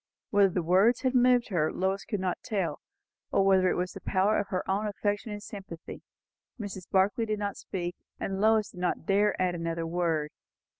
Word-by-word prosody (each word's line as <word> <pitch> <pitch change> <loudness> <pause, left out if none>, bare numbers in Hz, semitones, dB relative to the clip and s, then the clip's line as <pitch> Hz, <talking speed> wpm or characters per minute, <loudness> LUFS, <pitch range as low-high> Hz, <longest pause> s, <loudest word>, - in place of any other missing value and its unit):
Whether 200 -1 +5
the 180 -1 -1
words 195 +8 +4
had 260 -2 +1
moved 250 -2 +4
her, 165 -5 +1
Lois 190 +1 -1
could 205 -3 -2
not 185 -1 -2
tell, 190 -10 -2 0.5
or 195 - +3
whether 190 -1 +4
it - - +1
was 180 +1 -1
the - - -9
power 200 +2 +2
of 205 - -2
her 185 - -3
own 200 +3 0
affection 205 +1 -2
and 205 0 -6
sympathy; 190 -6 -9 0.6
Mrs. 195 -4 -6
Barclay 205 +5 +2
did 215 -1 -1
not 205 -1 -3
speak, 175 -2 -5 0.2
and 195 0 -3
Lois 220 0 +3
did - - -12
not 180 -2 -1
dare 205 +2 +2
add 185 -1 +1
another 165 -1 -3
word. 165 -3 -1
195 Hz, 195 wpm, -29 LUFS, 180-210 Hz, 0.6 s, Whether